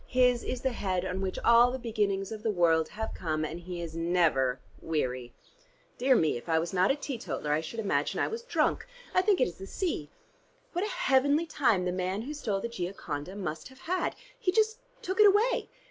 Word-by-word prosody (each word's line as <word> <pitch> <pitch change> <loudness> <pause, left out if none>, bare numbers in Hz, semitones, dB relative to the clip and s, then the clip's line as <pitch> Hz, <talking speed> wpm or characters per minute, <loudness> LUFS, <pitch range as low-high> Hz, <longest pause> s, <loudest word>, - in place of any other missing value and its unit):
His 250 -1 +3
is 250 - -3
the 265 - 0
head 190 -5 -1
on 185 +1 -3
which 190 -1 -2
all 235 +1 +7
the 255 - -3
beginnings 210 -5 -1
of 220 -1 -6
the 225 - 0
world 165 -5 +3
have 220 +1 -5
come, 155 -3 -2
and 160 +3 -5
he 175 0 -6
is 165 -1 -7
never 165 -7 +2 0.2
weary. 130 -6 -2 0.7
Dear 260 +1 +4
me, 155 - +2
if 120 - -10
I 160 - +3
was 165 +2 -1
not 185 +1 +3
a 270 - +3
teetotaller 250 - -4
I 150 +1 +2
should 225 +8 -6
imagine 210 - 0
I - - +2
was 455 +1 -4
drunk. 485 - 0 0.3
I 370 - +5
think 390 -1 +3
it - - +4
is 175 0 -9
the 195 - -7
sea. 310 - -2 0.6
What 355 +2 0
a 425 - -1
heavenly 290 - +2
time 240 - +2
the 180 - 0
man 185 +3 -2
who 290 +5 -5
stole 220 -10 -2
the - - -2
'Gioconda' 180 -5 -5
must 170 -5 -4
have 260 0 -17
had. 365 +2 -1 0.2
He 415 -7 +1
just 440 +3 +2 0.2
took 375 +3 -3
it 425 - +9
away. 420 +5 +3
205 Hz, 215 wpm, -29 LUFS, 170-270 Hz, 0.7 s, it